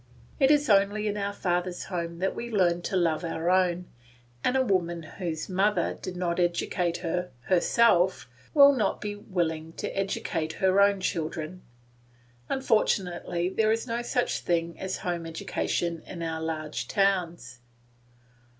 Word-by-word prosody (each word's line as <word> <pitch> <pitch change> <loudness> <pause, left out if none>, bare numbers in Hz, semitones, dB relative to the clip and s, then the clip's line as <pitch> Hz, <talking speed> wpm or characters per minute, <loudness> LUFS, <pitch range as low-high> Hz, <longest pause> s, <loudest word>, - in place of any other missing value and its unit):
It 270 -2 +5
is 295 0 +4
only 205 +1 +3
in 205 - -1
our 200 -1 -2
father's 180 -2 -2
home 170 -2 -4
that 190 +2 0
we 240 - -5
learn 175 -5 +2
to 190 - -3
love 165 -2 +1
our 165 +1 -1
own, 180 -1 +2 0.6
and 260 - +2
a 260 - +3
woman 175 -5 0
whose 160 -1 -5
mother 200 +3 +1
did 185 -1 -6
not 175 -1 -1
educate 175 0 0
her 180 +2 -1
herself 185 - +3 0.3
will 280 -1 +8
not 240 -6 0
be 205 0 -4
willing 165 -5 -3
to - - -5
educate 165 -5 -2
her 190 +1 +3
own 200 -1 +4
children. 165 0 -3 0.9
Unfortunately, 190 -8 0
there 215 +3 +2
is 225 +1 0
no 235 -1 -2
such 245 +1 0
thing 170 -1 -1
as 190 0 -3
home 170 -2 -2
education 165 0 -2
in 170 -2 -6
our 160 -1 -3
large 155 -7 -3
towns. 175 -11 0
180 Hz, 150 wpm, -27 LUFS, 170-200 Hz, 0.9 s, will